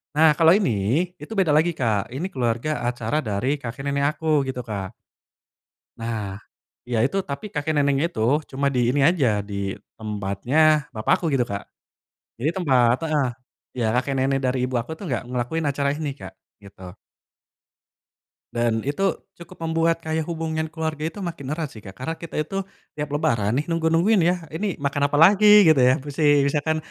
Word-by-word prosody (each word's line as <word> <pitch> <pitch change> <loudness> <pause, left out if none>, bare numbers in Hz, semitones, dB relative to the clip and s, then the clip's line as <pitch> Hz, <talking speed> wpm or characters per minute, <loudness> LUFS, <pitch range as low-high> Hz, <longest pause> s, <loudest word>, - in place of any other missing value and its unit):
nah 155 0 +5
kalau 165 0 +7
ini 150 - +2
itu 150 0 -12
beda 160 -6 +3
lagi 160 +3 +3
Kak 115 -8 -1
ini 150 +8 -3
keluarga 125 -1 -2
acara 120 +5 -1
dari 110 +6 -1
kakek 130 -1 -7
nenek 140 0 0
aku 155 -3 +2
gitu 130 -1 -4
Kak. 100 -3 -4 1.1
Nah, 110 -4 -4 0.5
iya 120 - -1
itu 140 - -1
tapi 140 +7 -5
kakek 150 +1 -1
neneknya 140 +1 +2
itu 110 - -5 0.3
cuma 140 +1 0
di - - +2
ini 140 +3 +1
aja 165 -7 +1 0.2
di 100 - -5 0.4
tempatnya 105 +4 -3 0.4
bapak 110 - +1
aku - - -5
gitu 125 -3 +2
Kak, 100 0 -3 0.8
jadi 140 +7 0
tempat 130 -9 +3
heeh, 150 -3 +1 0.5
ya 120 - 0
kakek 130 +3 0
nenek 135 +1 +1
dari 130 +1 0
ibu 130 0 -4
aku 115 - -9
tuh - - -8
nggak 120 - -1
ngelakuin 125 +6 -2
acara 140 0 0
ini 150 -2 -3
Kak - - -8 0.3
gitu. 95 -2 -12 1.6
Dan 120 -1 0
itu 145 +8 -1 0.3
cukup 170 - -13
membuat 165 +1 +1
kayak 160 0 -1
hubungan 160 -1 -2
keluarga 160 -1 -4
itu 165 - -15
makin 150 -5 -9
erat 160 -2 -2
sih 110 - -11
Kak 95 -2 -11
karena 145 +6 -3
kita 165 - -8
itu, 155 +5 -6 0.4
tiap 150 -1 -4
lebaran 115 -9 +1
nih 145 - -1
nunggu-nungguin 165 +5 +2
ya - - +3 0.2
ini 205 +6 -1 0.2
makan 140 0 0
apalagi 175 +8 +5 0.2
gitu 155 -4 +5
ya? 125 +1 +6
Musi 145 +2 -5 0.3
misalkan 150 +2 0
140 Hz, 170 wpm, -23 LUFS, 120-160 Hz, 1.6 s, kalau